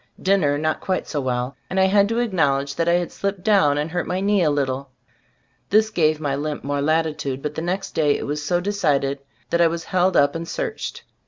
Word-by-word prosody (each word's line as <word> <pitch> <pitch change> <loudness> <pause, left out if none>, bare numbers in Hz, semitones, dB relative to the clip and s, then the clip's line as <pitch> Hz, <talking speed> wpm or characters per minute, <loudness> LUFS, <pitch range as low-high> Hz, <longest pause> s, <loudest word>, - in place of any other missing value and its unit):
Dinner 185 -7 +2
not 155 +1 -1
quite 185 -1 -2
so 145 - -2
well, 125 0 -2
and 190 - -1
I - - +5
had 200 +1 +4
to 230 - -1
acknowl 165 - +1
edge 140 0 -6
that 165 0 0
I - - +4
had 175 0 0
slipped 200 -2 -3
down 190 -10 +4
and 150 +2 -2
hurt 175 0 -2
my 180 - -1
knee 200 0 +2
a 160 - +3
little. 140 -2 -1 0.8
This 215 +1 +3
gave 155 -5 +2
my 145 -3 -1
limp 150 +1 -4
more 145 0 -1
latitude, 150 -3 -1
but 150 - -3
the 160 - -4
next 185 +3 -3
day 150 -2 +2
it - - -5
was 145 +1 -3
so 175 +4 +1
decided, 150 -8 0 0.3
that 170 - +2
I 170 - +6
was 165 0 -3
held 185 0 +1
up 145 0 +4
and 165 0 -5
searched. 475 - -4
160 Hz, 230 wpm, -22 LUFS, 145-190 Hz, 0.8 s, I